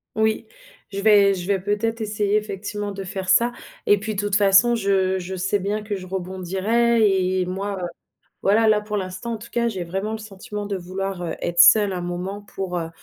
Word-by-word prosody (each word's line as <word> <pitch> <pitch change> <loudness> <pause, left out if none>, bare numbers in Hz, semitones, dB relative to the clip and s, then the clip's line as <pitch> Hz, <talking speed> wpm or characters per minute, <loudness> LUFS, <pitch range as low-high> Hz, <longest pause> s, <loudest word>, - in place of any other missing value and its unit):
Oui. 220 +1 0 0.4
Je 200 0 -4
vais 200 -2 +5
je 175 -1 -6
vais 200 -2 +1
peut-être 210 +4 -1
essayer, 210 -1 0
effectivement, 205 0 -3
de 195 0 -6
faire 190 0 -5
ça 235 +5 +4 0.3
et 205 -1 +4
puis 215 +1 -4
toute 205 0 -1
façon 205 +4 +5
je 195 -3 +1
je 185 +1 -5
sais 190 +3 0
bien 205 +3 -2
que 205 -1 -3
je 185 -1 -8
rebondirai 190 +5 +1 0.3
et 180 - 0
moi, 195 +2 -3
heu - - -1 0.5
voilà 220 +3 +3
là 215 -1 +4
pour 210 0 -3
l'instant 190 +5 -4
en - - -3
tout 225 +2 -13
cas 235 0 +1
j'ai 190 -6 -3
vraiment 195 +5 -3
le - - -3
sentiment 210 -1 -7
de 200 -1 -3
vouloir, 185 +1 -4
heu, 170 - -3
être 170 0 -2
seule 205 +1 +7
un 180 - -3
moment 180 +3 -4
pour, 190 -3 -4
heu, 165 -1 -4
200 Hz, 205 wpm, -23 LUFS, 190-215 Hz, 0.5 s, seule